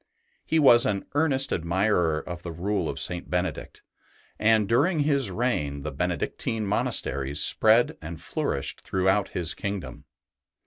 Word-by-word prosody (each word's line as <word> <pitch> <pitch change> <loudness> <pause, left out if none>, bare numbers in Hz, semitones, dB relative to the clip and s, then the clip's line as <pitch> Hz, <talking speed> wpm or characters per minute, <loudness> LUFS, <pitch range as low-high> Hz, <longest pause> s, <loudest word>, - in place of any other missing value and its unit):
He 160 - 0
was 120 -6 +6
an 100 -2 -2
earnest 145 -3 +2
admirer 85 -1 +1
of 85 +3 -7
the 85 - -6
Rule 90 +1 -2
of - - -4
St. 90 -1 -3
Benedict, 90 -3 -3 0.6
and 110 -1 +3
during 150 - +2
his 140 -5 +2
reign 75 - -2
the - - -4
Benedictine 110 -2 -2
monasteries 70 -7 -1
spread 110 +2 +3
and 80 0 -7
flourished - - -3
throughout 95 +2 0
his 85 -1 0
kingdom. 100 - -6
100 Hz, 135 wpm, -26 LUFS, 85-115 Hz, 0.6 s, was